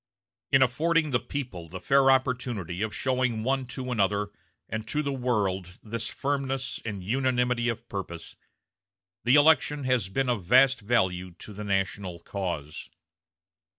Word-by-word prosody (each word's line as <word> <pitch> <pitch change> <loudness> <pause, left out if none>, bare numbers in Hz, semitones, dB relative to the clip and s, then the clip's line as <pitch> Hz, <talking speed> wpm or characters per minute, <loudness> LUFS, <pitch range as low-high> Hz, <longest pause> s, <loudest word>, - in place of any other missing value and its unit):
In 135 -1 +6
affording 155 +4 +1
the 120 - +3
people 110 - -6
the 95 +3 -7
fair 135 +3 +4
opportunity 125 -9 0
of 110 0 -1
showing 125 -4 0
one 135 +1 0
to 130 0 -5
another 105 -2 +1 0.4
and 110 0 -4
to 150 +5 -1
the 140 -1 -1
world 100 -8 -1
this 115 0 -4
firmness 135 -2 -2
and 100 -4 -5
unanimity 125 +1 +1
of 115 0 -4
purpose, 85 -5 -6 0.9
the 125 +3 +5
election 150 -1 +4
has 125 -7 +1
been 135 +6 0
of 120 -6 0
vast 130 +7 +5
value 95 -5 0
to 105 - -10
the 105 +2 -6
national 95 -2 -1
cause." 85 -5 -5
120 Hz, 145 wpm, -27 LUFS, 95-130 Hz, 0.9 s, In